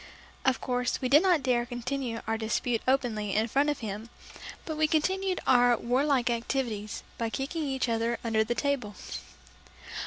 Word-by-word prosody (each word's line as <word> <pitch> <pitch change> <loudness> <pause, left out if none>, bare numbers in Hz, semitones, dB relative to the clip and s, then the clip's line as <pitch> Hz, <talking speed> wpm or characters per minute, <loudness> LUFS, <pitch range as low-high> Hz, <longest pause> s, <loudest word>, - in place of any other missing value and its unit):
Of 265 -1 +3
course, 250 0 -1
we 255 - -1
did 290 +4 +7
not 355 -6 +3
dare 245 -2 +2
continue 245 0 -3
our 225 - 0
dispute 225 +1 -1
openly 230 -6 +1
in 220 +2 +2
front 280 +5 +2
of 290 - -2
him, 215 +1 -5 0.6
but 315 - -3
we 310 0 +3
continued 375 +4 +1
our 245 -2 +5
war 250 +5 +1
like 265 -5 +2
activities 230 -3 -2 0.2
by 230 -1 0
kicking 290 +7 -3
each 265 -2 -1
other 230 0 0
under 220 -2 +2
the 240 +2 -2
table. 245 -5 -1
245 Hz, 165 wpm, -29 LUFS, 230-275 Hz, 0.6 s, did